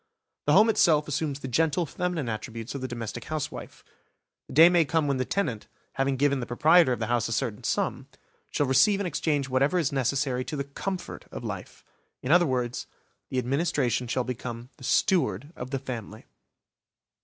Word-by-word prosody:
The - - +5
home 215 - +7
itself 155 -8 +3
assumes 145 -1 -2
the - - -5
gentle 160 +6 +1
feminine 170 -3 -3
attributes 115 +1 -5
of 140 - -5
the 130 - -2
domestic 120 -1 -6
housewife. 155 -2 -5 0.6
The - - -10
day 160 +5 +9
may 175 -1 +4
come 155 +1 0
when 140 -1 +1
the 130 - -1
tenant, 130 - -2 0.3
having 135 0 0
given 140 0 +2
the 120 - -4
proprietor 155 +4 +5
of 125 - 0
the 110 - -2
house 120 0 0
a - - -6
certain 115 0 -2
sum, 120 +4 -1 0.4
shall 145 - 0
receive 135 +10 +4
in 200 - -1
exchange 150 -4 0
whatever 135 +6 +2
is 160 -6 +1
necessary 135 -1 0
to 155 - -4
the 140 - -2
comfort 180 +7 -6
of - - -7
life; - - -7 0.4
in 130 - -1
other 175 0 +6
words, 125 -2 -2 0.4
the 130 - -3
administration 130 -2 0
shall 130 +2 0
become 120 -1 -6
the - - -14
steward 150 - +1
of 125 - -6
the 135 - -1
family. 115 -5 -7
135 Hz, 185 wpm, -27 LUFS, 125-155 Hz, 0.6 s, day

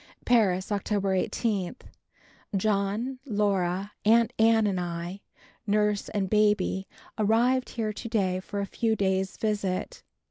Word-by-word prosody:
Paris, 200 -6 +2
October 200 -1 0
18. 195 +1 -1 0.8
John, 215 +5 0
Laura, 200 -5 0
Aunt 230 +2 +4
Ann 225 0 +5
and 195 -3 0
I, 175 +2 -5 0.5
nurse 210 0 +1
and 200 -2 -1
baby, 210 -2 +2 0.3
arrived 240 +5 +2
here 220 -3 -2
to 230 +3 -7
day 190 -5 +1
for 200 +2 -5
a - - -1
few 225 +3 0
days' 190 -2 0
visit. 205 -4 -2
205 Hz, 120 wpm, -27 LUFS, 190-220 Hz, 0.8 s, Ann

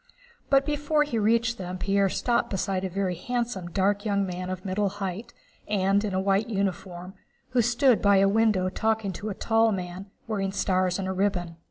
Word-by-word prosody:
But 275 0 +4
before 295 +1 +1
he 245 -6 -2
reached 230 +2 +1
them 180 0 -5
Pierre 195 +1 +1
stopped 240 +5 0
beside 190 -1 -2
a 190 - -2
very 190 0 -1
handsome, 235 0 -3
dark 200 +3 +1
man 190 -3 -1
of 185 0 -5
middle 200 +1 0
height, 200 +3 -5 0.4
and 200 0 +2
in 200 -3 -2
a - - +1
white 195 +3 +1
uniform, 190 -3 -3 0.4
who 250 -1 +2
stood 240 +1 +3
by 200 -1 +5
a 195 +1 +5
window 210 -3 +2
talking 220 +1 -1
to 210 +5 -5
a 200 - -4
tall 225 +1 +2
man 185 0 -5 0.2
wearing 195 -3 -2
stars 185 -2 +1
and 195 -1 -3
a - - -1
ribbon. 185 -3 -1
200 Hz, 185 wpm, -26 LUFS, 185-225 Hz, 0.4 s, by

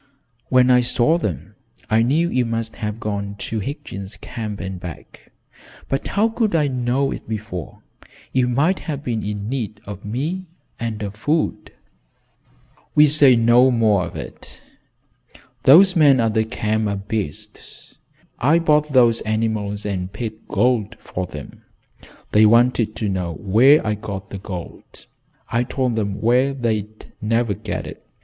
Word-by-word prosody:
"When 130 0 +5
I 125 0 +6
saw 125 +7 +2
them, 90 - -4 0.3
I 110 +1 +3
knew 150 +9 +2
you 125 - +2
must 115 -1 -4
have 105 -1 -4
gone 100 -2 -4
to 110 +2 -4
Higgins' 105 -4 -7
Camp 110 -4 -6
and 95 -1 -5
back, 85 -3 -11 0.6
but 135 - -2
how 210 +3 +2
could 225 -4 0
I 150 -3 +3
know 130 +1 0
it - - -7
before? 105 -6 -6 0.5
You 130 -1 +2
might 145 +10 +1
have 145 -3 -5
been 115 -5 -2
in 105 0 -4
need 115 -4 -4
of 100 -1 -8
me, 155 - -3 0.3
and 110 -2 -4
of 100 -1 -4
food." 150 +9 -2 1.2
"We'll 150 -1 +6
say 145 -4 +7
no 120 +2 +5
more 110 -6 +2
of - - -11
it. - - -9 1.0
Those 185 +7 +7
men 145 -5 +5
at 115 -2 +1
the 110 0 +1
camp 110 -1 -1
are 100 - -1
beasts. 100 -5 -7 0.5
I 145 +7 +4
bought 150 -3 +2
those 120 -3 +4
animals 110 -2 -2
and 95 -2 -3
paid 110 +1 -7
gold 110 0 +1
for 90 0 -5
them. 75 -4 -10 0.7
They 110 +1 +6
wanted 115 -1 +3
to 110 - -2
know 90 -3 -2
where 115 - +4
I 105 - +1
got 100 -2 -7
the 100 - -6
gold. 90 -3 -9 0.5
I 115 - +2
told 125 -1 -1
them 100 -3 -2
where 125 +4 +2
they'd 110 -4 -3 0.2
never 115 0 +1
get - - -5
it. - - -10
115 Hz, 155 wpm, -21 LUFS, 105-130 Hz, 1.2 s, say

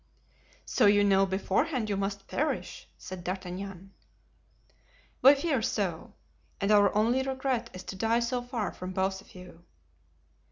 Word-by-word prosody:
"So - - +3
you 205 0 +5
know 195 -1 +4
beforehand 215 - 0
you 205 - -1
must 195 0 -3
perish!" 305 +3 -3
said 185 -2 -8
D'Artagnan. 185 +1 -6 1.3
"We 275 +3 +8
fear 280 -3 0
so, 195 -7 -2 0.4
and 200 +1 +1
our 205 -2 +6
only 235 +5 +3
regret 265 -2 -2
is 185 - -8
to - - -7
die 225 +4 +1
so 245 +1 -1
far 245 -4 -3
from 185 +1 -7
both 190 +1 -1
of - - -20
you." 180 -2 -13
200 Hz, 145 wpm, -29 LUFS, 190-240 Hz, 1.3 s, We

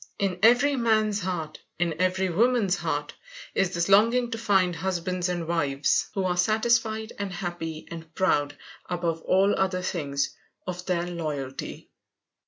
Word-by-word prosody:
In 190 -2 -1
every 250 +6 +5
man's 215 -4 +2
heart, 170 -4 -4 0.2
in 170 -1 -1
every 185 +1 +1
woman's, 200 0 +2 0.7
is 195 -2 +1
this 170 0 0
longing 230 +5 +4
to 225 - -2
find 190 -5 +2
husbands 185 0 -2
and 175 -2 -3
wives 145 -4 +1
who 195 - 0
are 180 -1 +1
satisfied 220 +3 +1
and 200 -1 -3
happy 175 -3 -5
and 165 -1 -8
proud, 145 -6 +1 0.3
above 170 -2 -1
all 195 +4 +3
other 185 -1 0
things, 140 -6 -1 0.3
of 180 -1 -5
their 175 -2 0
loyalty. 150 -6 -5
180 Hz, 140 wpm, -26 LUFS, 170-205 Hz, 0.7 s, every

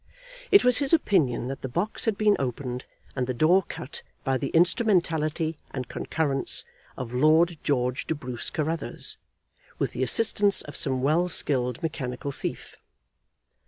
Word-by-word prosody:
It 400 -1 +6
was 250 0 +5
his 280 0 +2
opinion 160 - +2
that 135 - -6
the 130 - -4
box 175 - -2
had 220 -3 0
been 210 -1 +4
opened 125 -1 -4 0.3
and 125 -2 -1
the 130 - -2
door 170 +9 +4
cut 150 -5 -8 0.2
by 135 - 0
the 140 - -2
instrumentality 165 -4 +1
and 130 -2 -5
concurrence 140 -1 0 0.3
of 125 -2 -6
Lord 155 +5 +3
George 125 -3 -1
de 160 - -1
Bruce 125 -5 -5
Carruthers, 160 +1 -2 0.6
with - - -1
the - - -5
assistance 205 - +3
of 145 - -10
some 130 -1 +1
well 165 +6 +2
skilled 130 -3 0
mechanical 140 -4 -4
thief. - - -6
150 Hz, 150 wpm, -26 LUFS, 130-175 Hz, 0.6 s, It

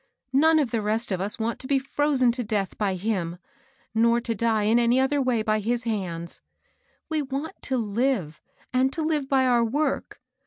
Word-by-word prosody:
None 315 +4 +5
of 280 -7 +1
the 230 - 0
rest 215 +2 -1
of 185 -1 -1
us 200 +2 0
want 230 0 -2
to 260 - -6
be 275 - +3
firozen 270 -2 +1
to 245 0 -3
death 205 -4 -2
by 200 -3 -1
him, 180 -3 -2 0.6
nor 230 +1 +3
to 235 -1 -2
die 225 0 +1
in 220 +3 +3
any 240 +2 +3
other 275 +2 +2
way 245 -4 +1
by 215 0 +1
his 235 +3 -1
hands. 180 -7 -4 0.7
We 315 -2 -1
want 280 +6 -5
to 265 - -1
Uve^ 215 - -1 0.3
and 260 +1 +3
to 320 - -2
live 300 -3 -1
by 265 -1 +3
our 240 -2 +3
work. 290 +7 -1
235 Hz, 195 wpm, -25 LUFS, 215-265 Hz, 0.7 s, None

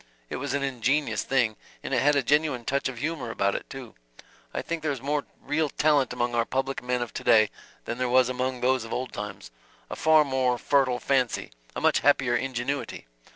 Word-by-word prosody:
It - - -2
was 140 +1 -2
an 140 - -1
ingenious 135 +2 0
thing 115 -5 +1 0.3
and - - -4
it - - +3
had 145 +1 +4
a 140 - +2
genuine 145 -3 +1
touch 140 0 0
of 130 - -8
humor 145 -2 -3
about 100 -3 0
it, - - -5
too. 135 -4 -9 0.6
I - - -3
think 165 -1 -3
there 155 -1 0
is 135 - -4
more 145 +3 -1
real 150 +1 -1
talent 145 -3 +2
among 120 0 -1
our 120 -1 +2
public 135 +3 -2
men 125 0 -1
of 120 - -9
to - - -5
day 110 -3 +5 0.3
than 120 - -4
there 125 -1 0
was 130 0 +5
among 130 0 -2
those 130 -1 +2
of 115 - -9
old 130 0 -3
times 95 -12 -7 0.4
a - - -3
far 155 -1 +5
more 130 -2 +1
fertile 130 -1 +2
fancy, 130 - 0 0.2
a - - -3
much - - +3
happier 130 -4 +3
ingenuity. 135 +2 -3
130 Hz, 210 wpm, -26 LUFS, 120-140 Hz, 0.6 s, day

